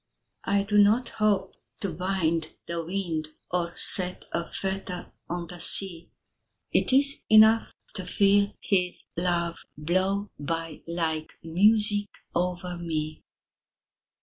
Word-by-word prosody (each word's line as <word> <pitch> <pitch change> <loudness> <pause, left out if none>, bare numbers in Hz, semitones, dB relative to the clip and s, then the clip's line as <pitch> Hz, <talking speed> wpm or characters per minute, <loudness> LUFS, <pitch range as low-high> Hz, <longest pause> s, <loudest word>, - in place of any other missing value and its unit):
I 200 0 +2
do 210 +1 +2
not 220 +5 +4
hope 210 -3 +1 0.3
to 195 -4 -2
bind 170 -2 -1
the 170 -1 -3
wind 170 -3 -3 0.2
Or 175 -1 -1
set 180 -1 0
a 170 0 -2
fetter 190 -1 -4 0.2
on 175 0 -3
the 175 +1 -10
sea 175 -2 -2 0.6
It - - +2
is 280 +2 +5
enough 220 +1 +6 0.2
to 185 -3 -6
feel 200 +1 +3
his 180 -3 0
love 170 -1 -1 0.2
Blow 190 +6 0
by 165 +1 -4
like 160 -2 -2
music 205 +4 +3 0.2
over 180 0 -2
me. 155 -2 -3
180 Hz, 120 wpm, -27 LUFS, 170-200 Hz, 0.6 s, enough